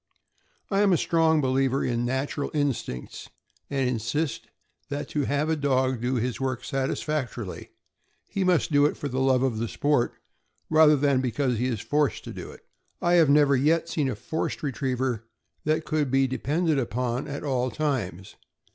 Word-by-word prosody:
I 195 - +2
am 200 -2 +4
a - - +4
strong 160 -2 +3
believer 135 0 +1
in 120 0 0
natural 135 +3 -2
instincts, 135 - -3 0.4
and 135 -2 0
insist 125 +4 -2 0.4
that 145 +1 -3
to 145 -2 -1
have 145 +3 0
a 160 - +1
dog 130 -4 +1
do 125 +2 0
his 125 +2 -2
work 130 -2 -2
satisfactorily, 135 -5 -3 0.6
he 195 - -2
must 180 -3 +2
do 145 0 +5
it - - -4
for 145 - -4
the 130 -1 -2
love 130 -1 +3
of 120 -5 0
the 115 - -1
sport, 145 0 +1 0.6
rather, 155 -1 +7
than 140 -2 +2
because 125 -1 0
he 125 - +1
is 115 -5 -2
forced 145 +5 0
to - - -7
do - - -7
it. - - -13 0.4
I 175 - +2
have 165 -4 +5
never 145 -1 +5
yet 160 +5 +2
seen 150 -5 0
a 125 - -2
forced 160 +11 -3
retriever 130 -3 -2 0.4
that 155 +1 +1
could 150 -3 0
be 135 +1 +3
depended 145 +5 0
upon 125 +2 -2
at 140 -1 -5
all 130 -3 0
times. 110 - -3
135 Hz, 175 wpm, -26 LUFS, 125-150 Hz, 0.6 s, rather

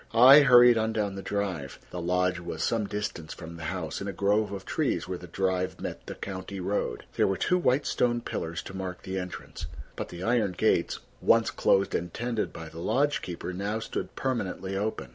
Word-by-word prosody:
I 130 +5 +10
hurried 125 -4 +7
on 110 0 0
down 105 -3 -1
the 95 - -6
drive. 95 -10 -3
The 90 - -4
lodge 90 +1 +1
was 85 -2 -4
some 110 -3 +1
distance 105 -7 -4
from 85 -1 -9
the 80 -1 -7
house, 90 -1 -3
in 100 - -4
a - - -1
grove 105 +1 +1
of 95 -1 -6
trees - - 0
where 90 -1 -4
the 90 - -10
drive 95 +1 -1
met - - -6
the - - -5
county 95 0 -6
road. 90 -10 -2
There - - +4
were 95 -1 0
two 180 - +2
white 140 -3 +2
stone 120 -1 +1
pillars 85 -6 -4
to 95 - -9
mark 95 -1 -5
the 95 0 -3
entrance, 90 -1 -7 0.3
but - - -5
the 85 +1 -7
iron 110 -4 +2
gates, - - +1 0.2
once - - +4
closed 95 0 +2
and 85 0 -1
tended 115 +1 -2
by 80 - -8
the 80 +1 -10
lodge 145 +11 +1
keeper, 90 +1 -5
now 100 +4 -2
stood 110 - -5
permanently 95 -7 -2
open. 100 - -2
95 Hz, 205 wpm, -28 LUFS, 90-110 Hz, 0.3 s, I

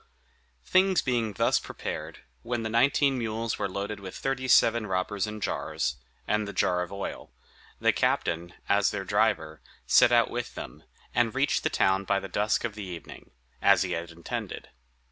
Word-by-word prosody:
Things 190 0 +3
being 115 -4 0
thus - - +2
prepared, - - -6 0.2
when 120 -1 -3
the 110 - -3
nineteen 135 +3 +3
mules 115 0 -2
were - - -1
loaded 100 +2 -4
with 95 -2 -8
thirty 135 -1 -2
seven 115 -3 +4
robbers 95 +2 -1
in 105 0 -6
jars, 65 - -2 0.3
and 105 0 +1
the 100 - -6
jar 90 0 +1
of 90 - -5
oil, 100 -9 -6 0.5
the - - +3
captain, 85 +2 0
as 100 0 +3
their 95 - -4
driver, 100 -8 +1 0.2
set 120 - +6
out 120 -1 +4
with 120 0 -4
them, - - -8 0.3
and 120 0 +1
reached 140 +2 +2
the 155 - 0
town 95 -8 +2
by 100 0 +2
the 95 - -7
dusk 105 +2 0
of 120 -3 -2
the 105 - -8
evening, 90 -4 -9 0.3
as - - +5
he - - -4
had 85 0 -3
intended. 85 0 -6
105 Hz, 175 wpm, -28 LUFS, 95-120 Hz, 0.5 s, set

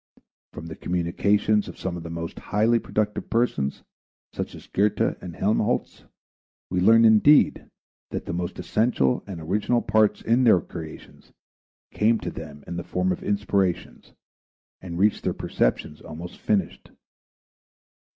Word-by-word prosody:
From - - -9
the 80 -1 -7
communications 100 +4 +1
of - - -9
some 95 -2 -4
of 85 - -6
the 85 - -8
most 85 0 -6
highly 115 +3 +2
productive 105 -2 -2
persons, 115 - 0 0.5
such - - -5
as - - -12
Goethe 105 +2 0 0.2
and 85 -3 -8
Helmholtz, 105 +1 -1 0.7
we 90 - +1
learn, 115 +5 +6
indeed, 110 +7 +5 0.4
that - - -5
the - - -4
most 85 0 -4
essential 105 - +1
and 95 -4 -6
original 105 +8 0
parts 110 -1 +2
in 120 +3 +3
their 110 -7 +6
creations 80 -2 -10 0.6
came 115 +2 +2
to - - -4
them 75 -3 -9
in 85 - -6
the 85 - -4
form 90 +1 -1
of 90 - -3
inspirations 100 -3 -1 0.7
and 85 -2 -6
reached 105 +3 +2
their - - -1
perceptions 75 +5 -1
almost 85 +3 -9
finished. 100 -5 -1
95 Hz, 140 wpm, -24 LUFS, 85-110 Hz, 0.7 s, learn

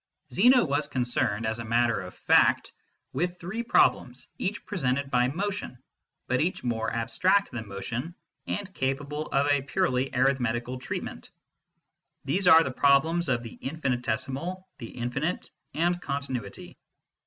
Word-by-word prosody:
Zeno 245 +3 +6
was 145 0 0
concerned, 120 -3 -1
as 110 +1 -2
a - - -4
matter 115 +1 +1
of 90 0 -9
fact, - - +3 0.4
with 175 +1 -2
three 190 +7 -4
problems, 235 - +2
each 205 +4 -3
presented 140 -7 -1
by 125 0 +3
motion, 190 -1 -3 0.5
but 130 - +1
each 175 +4 -1
more 115 -2 -1
abstract 185 - +1
than 110 -2 -6
motion, 120 - -5 0.3
and 200 -2 -4
capable 140 +2 -2
of 140 +1 +1
a 145 -1 +3
purely 135 -3 0
arith 135 +1 +2
metical 120 +1 -2
treatment. - - -6 1.0
These 180 +7 +1
are 160 -1 +9
the 135 - -3
problems 145 +5 +3
of 120 -2 0
the 115 - -8
infinitesimal, 135 +5 -2
the 115 -4 -7
infinite, 130 +8 -3 0.2
and 175 +2 +1
continuity. 130 - -5
135 Hz, 140 wpm, -27 LUFS, 120-170 Hz, 1.0 s, are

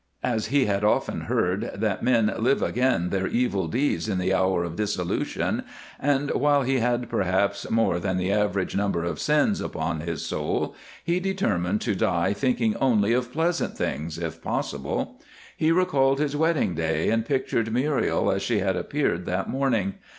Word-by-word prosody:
As 115 -4 0
he 140 +3 +3
had 100 0 0
often 105 - +1
heard 90 +3 0
that 105 -2 -1
men 115 -4 +3
live 130 +5 +2
again 125 -9 +1
their 95 -1 0
evil 120 -6 0
deeds 130 -2 0
in 95 - 0
the 90 +1 +1
hour 95 -2 +2
of 85 -1 -5
dissolution, 90 -3 -1 0.4
and 145 0 +1
while 145 0 +3
he 130 +1 +1
had 120 0 0
perhaps 100 +2 0
more 110 -6 +2
than 95 +1 -1
the 90 +1 0
average 100 -2 0
number 100 -4 0
of 85 - -3
sins 150 +7 +2
upon 80 0 -3
his 85 +1 -4
soul, - - -2 0.3
he 170 +2 +1
determined 105 - 0
to 110 - 0
die 95 0 +1
thinking 115 -1 +1
only 115 -5 +3
of 125 0 0
pleasant 165 +4 -1
things, 80 +2 -3
if 85 -2 -5
possible. - - -3 0.3
He 160 +1 +2
recalled 140 -7 +3
his 145 -1 0
wedding 160 - +1
day, 80 -1 0
and 115 0 +2
pictured 115 -3 -1
Muriel 135 +4 +1
as 95 - -1
she 115 - 0
had 95 -1 +1
appeared 90 - -1
that 90 +1 -1
morning. 120 -8 0
110 Hz, 170 wpm, -25 LUFS, 95-135 Hz, 0.4 s, he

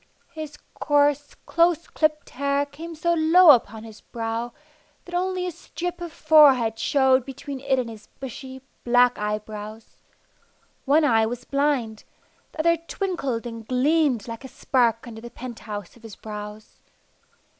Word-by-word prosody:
His 310 -2 -7 0.2
coarse, 290 -1 +2
close 335 0 +2
clipped 305 -1 -1
hair 280 +1 0
came 320 +4 -9
so 340 +2 +1
low 330 +1 +7
upon 225 -4 +1
his 220 -2 -12
brow 230 0 -4 0.5
that 350 - -12
only 365 0 -1
a 360 - -2
strip 350 +1 -6
of 345 -1 -5
forehead 275 -9 +5
showed 265 -3 +3
between 275 +1 -7
it 270 0 0
and 250 -2 -1
his 220 -2 -11
bushy, 265 0 -8 0.2
black 245 0 +3
eyebrows. 210 +1 -6 0.9
One 295 +3 +4
eye 225 -5 +3
was 245 +2 -6
blind; 275 -6 -1 0.5
the 315 - -2
other 335 +1 +3
twinkled 330 - -3
and 230 -2 -8
gleamed 265 -3 +1
like 230 +2 -7
a - - -7
spark 240 -3 0
under 225 -2 -9
the 235 - -9
penthouse 220 -6 -8
of 235 - -19
his 225 -4 -11
brows. 210 0 -9
265 Hz, 145 wpm, -24 LUFS, 230-310 Hz, 0.9 s, low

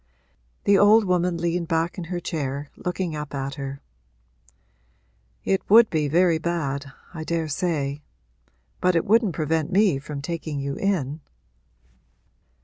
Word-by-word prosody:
The 200 -1 +4
old 215 +2 +6
woman 180 -1 +1
leaned 170 0 -1
back 165 +1 0
in 175 - -5
her 175 +1 -3
chair, 145 -4 -4
looking 180 -2 -3
up 150 -1 -6
at 135 0 -3
her. 140 -1 -6 1.6
'It 195 - +1
would 225 +2 +7
be 155 -2 +1
very 170 +2 +3
bad, 145 -5 -2 0.2
I 160 -2 -5
daresay. 155 -3 -2 0.8
But 180 -1 +2
it 165 - +2
wouldn't 215 -5 +3
prevent 155 -1 -1
me 195 -7 +3
from 145 +1 -7
taking 155 -2 -4
you 140 0 -3
in.' 155 -6 -1
165 Hz, 135 wpm, -24 LUFS, 145-180 Hz, 1.6 s, would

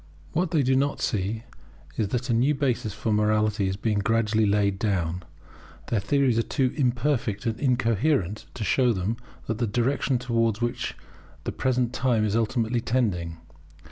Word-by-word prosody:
What 180 +1 +1
they 155 -4 +2
do 130 +1 +3
not 140 +2 +1
see 110 +1 -1 0.5
is 110 - 0
that 120 +4 -2
a - - +3
new 130 +6 +3
basis 125 -6 0
for 110 +1 -2
morality 105 -1 +2
is 95 0 -2
being 105 0 0
gradually 110 +1 +2
laid 100 -1 +2
down. 90 -5 -1 0.7
Their 115 - +1
theories 125 +3 +2
are - - +4
too 130 +1 0
imperfect 125 -5 0
and 115 -2 -1
incoherent 115 - +1
to 115 - -3
show 125 +2 +3
them 100 +4 -2 0.3
the 115 +1 -1
direction 125 +4 +1
towards 115 -3 0
which 120 0 -2 0.5
the - - -2
present 125 -2 0
time 120 -4 +2
is 105 0 0
ultimately 115 +1 +1
tending. 90 -10 -1
115 Hz, 160 wpm, -26 LUFS, 105-125 Hz, 0.7 s, are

